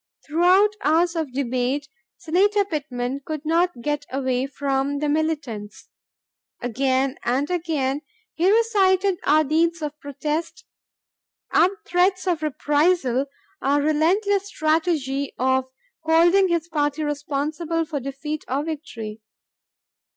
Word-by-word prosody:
Throughout 365 +6 +4
hours 335 +3 +3
of 320 -5 -2
debate, 260 +2 -1 0.3
Senator 400 +5 +2
Pittman 275 -6 -3
could 310 0 -5
not 335 -4 +1
get 295 -1 -2
away 260 -1 -1
from 275 0 -1
the 300 +1 -1
militants. 290 -9 -3 0.7
Again 260 +2 0
and 265 +7 0
again, 300 -5 -1 0.3
he 355 +4 +3
recited 395 -4 +3
our 310 +1 +5
deeds 330 +3 +1
of 300 0 -5
protest, 305 +5 -4 0.9
our 345 - +5 0.2
threats 370 +2 +2
of 345 -4 0
reprisal, 295 -2 +1 0.3
our 280 +2 +2
relentless 375 +7 +2
strategy 310 -6 0
of 260 +1 +2 0.4
holding 340 +4 +4
his 340 -2 0
party 300 -2 -1
responsible 300 +3 -2
for 305 -3 -3
defeat 275 +3 -5
or 275 +3 -1
victory. 230 -9 -6
300 Hz, 115 wpm, -23 LUFS, 275-340 Hz, 0.9 s, our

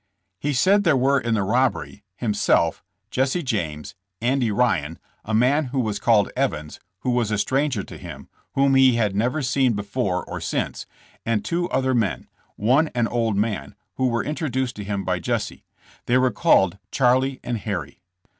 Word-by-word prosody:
He 145 - -1
said 195 +10 +4
there 160 -7 +3
were 135 +2 +3
in 115 -2 -1
the 100 - +1
robbery 120 -1 0
himself, 100 -8 +1 0.3
Jesse 135 +7 0
James, 80 - -3 0.3
Andy 125 0 +1
Ryan, 85 -9 0 0.3
a 110 - -2
man 135 +7 +3
who 130 +1 -3
was 105 -4 -1
called 105 -2 +3
Evans, 75 - -2 0.2
who 125 - 0
was 120 -3 +1
a 105 - 0
stranger 130 -1 0
to - - -11
him, - - -9 0.3
whom 135 0 +3
he 130 -2 +5
had 105 -4 0
never 125 +8 0
seen 130 -1 +2
before 100 -2 -2
or - - -6
since, - - -3 0.4
and 115 -2 -1
two 175 +1 -1
other 130 0 +1
men, 100 - -1 0.3
one 130 +9 +3
an 120 -2 +2
old 115 -3 0
man, 100 -10 -2 0.2
who 130 - +2
were 115 -1 0
introduced 130 -5 -2
to 105 - -5
him 100 -1 -3
by 90 -1 0
Jesse; 85 - -3 0.4
they 125 - +4
were 130 0 +3
called 100 - +3
Charlie 130 +1 +2
and 120 -2 -3
Harry. 95 -9 -5
120 Hz, 175 wpm, -23 LUFS, 105-130 Hz, 0.4 s, he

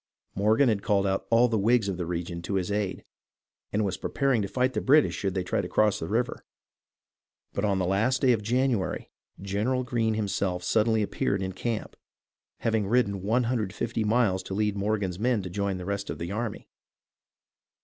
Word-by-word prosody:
Morgan 110 +7 +3
had 105 -4 +1
called 100 -1 +2
out 95 0 -1
all 115 +2 +5
the 115 -3 0
Whigs 115 +1 +3
of 95 -3 -2
the 90 -2 -3
region 85 0 -4
to 100 +3 -3
his 95 +1 -1
aid, 100 -2 -2 0.7
and 105 +1 +1
was 95 -2 -2
preparing 135 -5 0
to 100 - -2
fight 130 +4 0
the - - -1
British 150 +3 +4
should 95 -2 -2
they 95 - 0
try - - 0
to - - -5
cross 105 -2 +2
the 80 - -4
river; 120 +6 -1 1.1
but 100 - -2
on 100 -2 +2
the 95 - 0
last 110 +9 +1
day 130 - +6
of 115 -3 +1
January 120 -2 0 0.3
General 105 +7 -1
Greene 115 -3 0
himself 100 -4 -1
suddenly 110 +3 +2
appeared 100 -1 -1
in 95 - -2
camp, 115 +4 -3 0.7
having 110 -3 +1
ridden 100 -4 +1
150 115 0 0
miles 105 -4 +2
to 95 - -6
lead 105 0 0
Morgan's 100 -3 -1
men 120 -2 +1
to 90 - -6
join 100 0 -1
the 90 - -7
rest 100 0 -3
of - - -4
the 85 +2 -5
army. 110 +1 -4
105 Hz, 190 wpm, -27 LUFS, 95-115 Hz, 1.1 s, day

